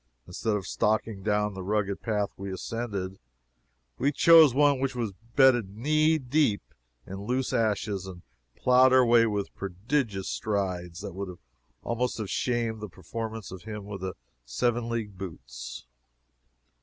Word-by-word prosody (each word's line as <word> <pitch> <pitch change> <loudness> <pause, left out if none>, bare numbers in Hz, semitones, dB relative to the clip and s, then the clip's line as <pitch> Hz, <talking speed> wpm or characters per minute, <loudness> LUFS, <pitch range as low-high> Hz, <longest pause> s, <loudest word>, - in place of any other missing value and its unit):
Instead 105 - -2
of 100 -3 -3
stalking 110 -1 0
down 105 0 0
the 95 - -6
rugged 100 0 -1
path 105 -3 -1
we 100 0 -6
ascended, 95 -2 -4 0.8
we 140 +3 +2
chose 160 0 +7
one 140 +1 +3
which 135 -1 -1
was 115 -5 -2 0.2
bedded 120 -7 +4
knee 155 +5 +3
deep 130 -6 +1 0.4
in 95 +1 -7
loose 125 +1 0
ashes, 105 -3 0
and 90 -2 -10 0.3
ploughed 125 +1 +5
our 130 -1 +6
way 115 -1 +5
with 105 -2 -2
prodigious 100 +2 -2
strides 90 -5 -2
that 95 - -6
would 95 -1 -6 0.5
almost 120 +1 -1
have 110 -4 -4
shamed 115 -3 -1
the 105 - -6
performance 110 +4 -6
of 95 -1 -8
him 105 -1 -7
of 100 -2 -6
the 95 -1 -4 0.3
seven 115 - -1
league 105 -5 -4
boots. - - -8
105 Hz, 145 wpm, -28 LUFS, 95-120 Hz, 0.8 s, chose